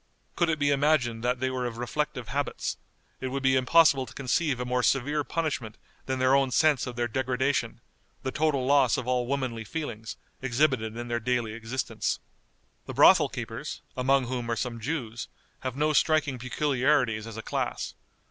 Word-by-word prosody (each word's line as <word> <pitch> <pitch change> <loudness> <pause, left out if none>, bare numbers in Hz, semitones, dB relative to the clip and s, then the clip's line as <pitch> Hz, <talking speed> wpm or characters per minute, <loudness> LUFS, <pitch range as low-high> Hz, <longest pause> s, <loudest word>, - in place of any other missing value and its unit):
Could 170 -1 +2
it 160 - +1
be 145 -1 +2
imagined 135 -5 +2
that 125 0 0
they 130 +1 0
were 125 -1 -2
of 115 -1 -6
reflective 125 -1 -3
habits, 145 +4 -2 0.4
it 130 - -3
would 135 +1 -3
be 130 0 +4
impossible 135 0 +4
to 125 - -13
conceive 140 0 0
a 125 - -2
more 125 0 0
severe 140 +4 +1
punishment 140 -10 -3 0.3
than 130 0 -1
their 130 +1 +3
own 135 -1 +3
sense 145 0 +3
of 125 - -5
the 120 0 0
degradation, 130 +3 -1 0.4
the 130 - -2
total 145 -4 +1
loss 135 -3 +4
of 125 - -4
all 125 -1 +1
womanly 130 -4 -2
feelings, 115 -4 -5 0.2
exhibited 130 -4 +1
in 120 0 -5
their 120 0 -1
daily 120 -2 -1
existence. 115 +3 -2 0.7
The - - -6
brothel - - +7
keepers, - - -6
among 135 +1 +2
whom 120 -1 -3
are 115 - +1
some 115 0 -3
Jews, 120 -3 -4 0.3
have 130 -1 -4
no 150 +2 +1
striking 150 -4 +2
peculiarities 125 -3 +1
as 115 -1 -8
a 110 - -6
class. - - -3
130 Hz, 175 wpm, -27 LUFS, 120-140 Hz, 0.7 s, brothel